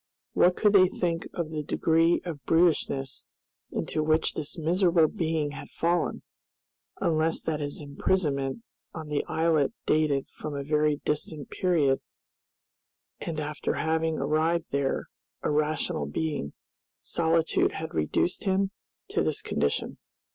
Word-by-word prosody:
What 180 Hz, 0 st, +4 dB
could 210 Hz, -1 st, +4 dB
they 185 Hz, -2 st, +7 dB
think 170 Hz, -2 st, -2 dB
of 170 Hz, -3 st, -3 dB
the 155 Hz, -1 st, -2 dB
degree 165 Hz, +3 st, +2 dB
of 155 Hz, -6 st, -5 dB
brutishness 155 Hz, -5 st, +1 dB, 0.4 s
into 155 Hz, -, -2 dB
which 155 Hz, +1 st, +2 dB
this 155 Hz, +1 st, -4 dB
miserable 170 Hz, 0 st, +3 dB
being 160 Hz, -5 st, -1 dB
had 140 Hz, -, -8 dB
fallen, 170 Hz, 0 st, 0 dB, 0.8 s
unless 160 Hz, -1 st, +1 dB
that 155 Hz, -2 st, -1 dB
his 145 Hz, -1 st, -3 dB
imprisonment 145 Hz, +2 st, -1 dB, 0.3 s
on 160 Hz, -2 st, -6 dB
the 150 Hz, -1 st, 0 dB
islet 160 Hz, -4 st, +2 dB
dated 150 Hz, -3 st, +2 dB
from 150 Hz, -1 st, -6 dB
a 140 Hz, -, -3 dB
very 150 Hz, +1 st, +2 dB
distant 150 Hz, -1 st, -3 dB
period 155 Hz, -8 st, +2 dB, 1.2 s
and 160 Hz, -2 st, -4 dB
after 150 Hz, 0 st, -2 dB
having 160 Hz, 0 st, 0 dB
arrived 155 Hz, +4 st, +1 dB
there 140 Hz, -1 st, 0 dB, 0.4 s
a -, -, +1 dB
rational 155 Hz, +2 st, 0 dB
being 150 Hz, -, -2 dB, 0.5 s
solitude 165 Hz, -1 st, +1 dB
had 160 Hz, 0 st, -5 dB
reduced 80 Hz, -, 0 dB
him 195 Hz, 0 st, +2 dB, 0.4 s
to -, -, +1 dB
this -, -, -1 dB
condition. -, -, -1 dB
155 Hz, 130 wpm, -28 LUFS, 150-170 Hz, 1.2 s, they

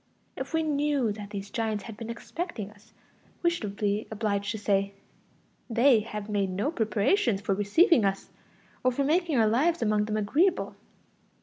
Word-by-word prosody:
If -, -, -5 dB
we 320 Hz, -1 st, +1 dB
knew 290 Hz, -5 st, +1 dB
that 205 Hz, -1 st, -7 dB
these 200 Hz, -1 st, -6 dB
giants 220 Hz, -4 st, -2 dB
had 225 Hz, -, -8 dB
been 230 Hz, +1 st, -7 dB
expecting 235 Hz, -, -5 dB
us, 210 Hz, +1 st, -22 dB, 0.5 s
we 345 Hz, -, +4 dB
should 210 Hz, -, -4 dB
be 205 Hz, +1 st, -1 dB
obliged 205 Hz, -2 st, -1 dB
to 220 Hz, -, -2 dB
say: 200 Hz, -1 st, 0 dB, 0.7 s
they 240 Hz, +1 st, +5 dB
have 210 Hz, -1 st, -6 dB
made 200 Hz, -2 st, 0 dB
no 200 Hz, +11 st, -1 dB
preparations 225 Hz, -, +1 dB
for 200 Hz, 0 st, -1 dB
receiving 220 Hz, -, +4 dB
us, 195 Hz, 0 st, -1 dB, 0.5 s
or 255 Hz, -, +4 dB
for 275 Hz, +3 st, 0 dB
making 320 Hz, 0 st, +1 dB
our 225 Hz, -, +5 dB
lives 290 Hz, +11 st, +2 dB
among 210 Hz, -1 st, +2 dB
them 215 Hz, 0 st, -2 dB
agreeable. 315 Hz, -, +1 dB
220 Hz, 170 wpm, -28 LUFS, 205-280 Hz, 0.7 s, they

